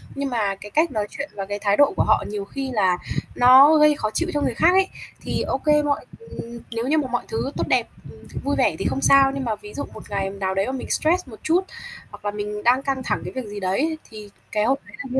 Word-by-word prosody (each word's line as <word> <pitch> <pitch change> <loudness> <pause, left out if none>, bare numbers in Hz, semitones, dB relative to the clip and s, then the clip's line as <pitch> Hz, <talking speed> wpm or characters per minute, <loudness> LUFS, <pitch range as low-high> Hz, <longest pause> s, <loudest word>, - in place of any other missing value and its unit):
nhưng 280 0 -2
mà 210 -5 0
cái 200 +2 -12
cách 315 +4 +2
nói 210 -4 -2
chuyện 285 +1 -6
và 195 -1 -4
cái 205 +1 -4
thái 200 0 +1
độ 285 -1 +5
của - - +3
họ - - +3
nhiều 205 -1 -4
khi 270 +5 -5
là 190 -5 +2 0.4
nó 260 +5 +8
gây 300 0 +5
khó 215 - -2
chịu 340 +1 -1
cho 290 - 0
người 250 - 0
khác 325 +9 +4
ấy. 385 0 +4 0.3
Thì, - - -2
ô - - -1
kê, 300 -1 +2
mọi 290 -1 -1
ừm, 235 - -9
nếu 230 +1 -3
như 310 +3 +2
mà 295 -4 0
mọi 245 - -1
thứ 450 - -3
tốt - - -1
đẹp, - - +2 0.2
ừm, - - -15 0.2
vui 285 +1 0
vẻ 185 - +2
thì 195 - -3
không 275 - -1
sao, 275 -1 +6
nhưng 275 - -3
mà 225 -2 -1
ví 210 0 -13
dụ 285 - -4
một 215 - -10
ngày 195 -1 -1
nào 195 -1 -3
đấy 195 +6 0
mình 265 -1 -6
stress 340 +1 +1
một 230 - -10
chút, 340 +4 +3 0.5
hoặc - - -13
là 205 - 0
mình 210 0 -5
đang 250 +3 +3
căng 270 -2 -2
thẳng - - -1
cái - - -5
việc 260 -2 -4
gì 205 0 -6
đấy 190 0 -1
ấy, 315 +2 0
thì 210 -2 -10 0.2
cái 210 -1 +1
hôm 265 +4 +2
đấy - - -12
là 265 - -9
như - - +3
250 Hz, 275 wpm, -23 LUFS, 205-285 Hz, 0.5 s, nó